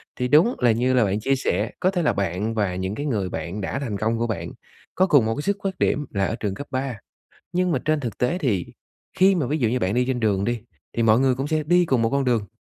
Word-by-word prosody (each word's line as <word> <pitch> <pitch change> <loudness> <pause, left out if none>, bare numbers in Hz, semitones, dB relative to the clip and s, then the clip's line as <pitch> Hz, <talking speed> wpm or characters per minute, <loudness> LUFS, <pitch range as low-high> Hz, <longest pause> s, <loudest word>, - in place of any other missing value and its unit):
Thì 125 - -1
đúng 165 - +5
là 120 -2 +4
như 125 +3 +1
là 125 -2 +4
bạn 100 +1 0
chia 135 +5 +1
sẻ, 105 -4 -1
có 185 - +2
thể 180 -2 -1
là 150 - +2
bạn 100 +3 -2
và 100 -4 0
những 95 +2 -3
cái 145 - -4
người 100 -9 -1
bạn 85 +5 -5
đã 100 +8 -3
thành 120 -8 -3
công 110 +3 0
của 120 - 0
bạn 110 - -4 0.4
có 185 - +4
cùng 145 - +5
một 115 0 0
cái 145 - -3
xuất 200 +3 0
phát 195 -1 -3
điểm 150 - +1
là 100 -2 0
ở - - -2
trường 105 -4 -3
cấp 145 - -7
3. 130 -2 -2 0.6
Nhưng 180 0 +1
mà 135 - +1
trên 155 0 +1
thực 120 -6 -5
tế 160 +9 0
thì 105 - 0 0.5
khi 190 +1 +6
mà 160 -8 0
ví 150 +5 -1
dụ 120 -6 +2
như 125 +3 0
bạn 95 0 0
đi 125 +1 +2
trên 130 -2 -1
đường 100 -3 +1
đi, 120 +1 -1 0.4
thì 115 - +2
mọi 110 +1 +4
người 130 -1 +3
cũng 135 +2 -3
sẽ 155 0 0
đi 175 +2 +4
cùng 130 -6 +2
một 115 - +1
con 140 +1 +1
đường, 115 -5 +1
125 Hz, 285 wpm, -23 LUFS, 105-145 Hz, 0.6 s, khi